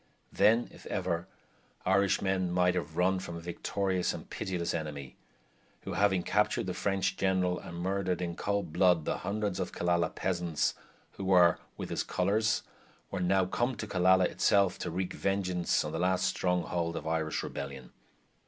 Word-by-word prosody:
Then, 115 +3 +4
if - - -13
ever, 90 -3 -2 0.6
Irishmen 95 -1 +2
might 90 0 +3
have 85 -3 -4
run 95 +1 +3
from 85 -2 -6
a - - -5
victorious 90 +2 -1
and - - -9
pitiless 90 -3 -3
enemy, 75 -5 -5 0.7
who - - -5
having 95 -3 +2
captured 105 +3 +1
the 90 - -2
French 95 0 0
general 95 -2 +1
and 85 - -8
murdered, 95 0 -1
in 85 -1 -3
cold 100 -5 -2
blood, 90 -4 +4
the - - -1
hundreds 100 -1 -2
of 90 - -2
Killala 85 0 0
peasants 85 -4 0 0.4
who 95 - -7
were 90 -2 +5 0.2
with - - -5
his - - 0
colors, 105 +1 +1 0.5
were 95 - -2
now 95 +1 +3
come 120 +7 -1
to - - -5
Killala 95 0 +4
itself 100 0 +2
to 85 - -3
wreak 90 +2 -3
vengeance 95 -3 0
on - - -4
the 80 - -3
last 90 +1 +2
stronghold 90 -2 0
of 75 - -5
Irish 80 -1 -1
rebellion. 65 -3 -6
90 Hz, 160 wpm, -30 LUFS, 85-95 Hz, 0.7 s, were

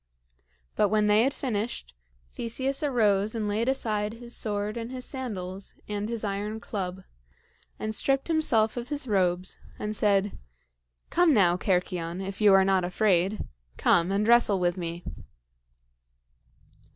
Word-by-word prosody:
But 205 - +3
when 215 0 +2
they 210 +1 +5
had 265 +4 +2
finished, 215 - -4 0.4
Theseus 260 +4 -2
arose 215 -7 +2
and 215 -2 -1
laid 220 +4 0
aside 215 -5 -1
his 235 +1 -7
sword 210 -1 -2
and 230 +1 -5
his 255 -1 -4
sandals 195 -8 -5
and 210 +1 -3
his 230 -2 -3
iron 205 +2 -3
club, 190 -4 -5 0.7
and 215 0 -3
stripped 270 +5 +1
himself 250 -10 +2
of 240 +2 -5
his 290 -3 -3
robes, 185 -3 0 0.2
and 210 0 -3
said: 200 -1 +1 0.7
"Come 345 -4 +4
now, 175 -5 +4
Cercyon, 180 -2 -1
if 195 +2 -6
you 210 -1 +6
are 195 0 +6
not 190 -1 +2
afraid; 185 +1 +1 0.3
come, 175 +2 +3
and 205 +2 +1
wrestle 235 -4 +5
with 175 -1 +1
me." 170 -1 -5
210 Hz, 140 wpm, -27 LUFS, 190-235 Hz, 0.7 s, you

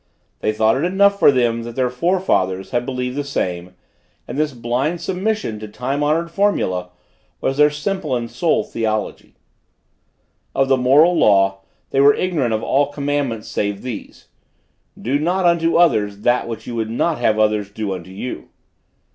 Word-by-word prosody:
They - - 0
thought 110 +3 +2
it 140 - -1
enough 200 +3 +3
for - - +7
them 120 -3 +1
that 115 0 -8
their 125 -2 0
forefathers 125 - 0
had 120 -1 -1
believed 125 -1 -3
the 145 - -2
same; 90 -10 -3 0.5
and 120 - -6
this 150 +1 0
blind 125 +7 -2
submission 190 - -2
to 110 - -7
time 130 +7 -3
honored 160 +3 +1
formulæ 130 - 0 0.5
was 135 - -1
their 150 0 +6
simple 150 -1 -2
and 120 -1 -3
sole 120 +1 0
theology. 110 -2 -3 1.2
Of 135 0 +2
the 135 - +5
moral 145 +8 +5
law, 95 -7 +3 0.3
they 135 - +3
were 140 +1 +6
ignorant 160 -10 0
of 110 - -4
all 140 +1 +2
commandments 140 -6 -2
save 100 -1 -3
this: 125 -5 -8 0.7
Do 135 +4 0
not 180 +4 0
unto 170 -1 +2
others 110 -12 +2
that 120 +2 +1
which 115 -1 -6
you 120 - -6
would 110 -1 -2
not 155 +8 0
have 110 -1 +2
others 105 -2 +1
do 105 -1 -4
unto 90 -1 -8
you. 100 +7 -7
125 Hz, 165 wpm, -19 LUFS, 110-150 Hz, 1.2 s, for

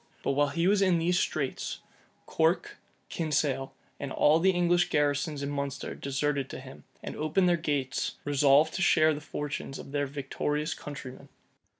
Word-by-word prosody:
But - - +1
while 145 +1 +2
he 165 +4 -1
was 200 0 +3
in 185 -3 +4
these 175 +2 +2
straits, 140 -4 -2 0.4
Corke, 165 +2 0 0.3
Kinsale, 145 -4 -1 0.3
and 140 -1 -5
all 150 +4 +4
the 190 +3 +4
English 175 -1 +2
garrisons 145 0 0
in 140 - -3
Munster 140 -1 -3
deserted 140 0 -2
to - - -7
him, 130 0 -12 0.2
and - - -6
opening 155 +5 +1
their 175 -1 +4
gates, 145 -5 -2
resolved 145 +2 +4
to - - -3
share 155 -3 +4
the 150 - -6
fortunes 145 -2 -5
of - - -10
their 145 0 0
victorious 150 +3 -2
countrymen. 140 -4 -9
145 Hz, 165 wpm, -29 LUFS, 140-165 Hz, 0.4 s, in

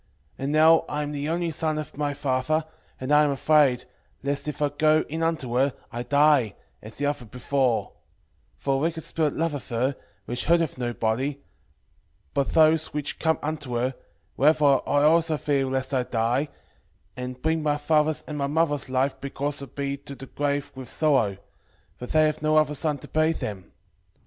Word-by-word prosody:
6:14 - - -41 0.3
And 135 +2 -2
now 160 +1 +6
I 150 0 -2
am 145 - -4
the 145 +1 -3
only 170 0 -1
son 155 0 -1
of 155 - -6
my 145 0 -2
father, 140 +4 0 0.3
and 130 +2 -4
I 150 0 +6
am 150 - +2
afraid, 140 -2 +3 0.4
lest 140 +1 -2
if 150 - -4
I 145 -1 +2
go 155 +1 +3
in 160 +2 -4
unto 160 -7 -1
her, 135 +1 +2 0.2
I 120 - -4
die, 140 -4 +3 0.3
as 110 +1 -10
the 145 - -1
other 145 -4 -2
before: 125 +1 0 0.6
for 135 - -1
a - - +2
wicked 160 +1 -1
spirit 155 -3 -1
loveth 155 -4 -2
her, 125 +4 0 0.3
which 120 +1 -3
hurteth 165 -5 +2
no 120 -1 -1
body, 135 +6 -1 0.9
but 140 - 0
those 160 0 +4
which 150 -1 -2
come 160 -1 +2
unto 145 -5 -3
her; 125 +3 0 0.4
wherefore 150 -1 +4
I 145 0 +3
also 160 0 +4
fear 140 -2 0
lest 130 +1 -2
I 130 - +3
die, 125 +4 0 0.7
and 125 0 -6
bring 160 +3 0
my 150 -1 +1
father's 150 +1 +1
and 150 -1 -5
my 140 - 0
mother's 145 -2 0
life 135 +1 0
because 140 +1 -3
of 135 -1 -11
me 140 0 -2
to 140 0 -10
the 135 +1 -9
grave 145 +1 -2
with 130 -2 -9
sorrow: 135 -11 +2 0.6
for 125 - -8
they 155 +3 +4
have 155 -1 -1
no 155 0 +3
other 155 -1 +3
son 150 0 -1
to - - -12
bury 155 +1 +2
them. 100 - -6
145 Hz, 190 wpm, -25 LUFS, 130-155 Hz, 0.9 s, now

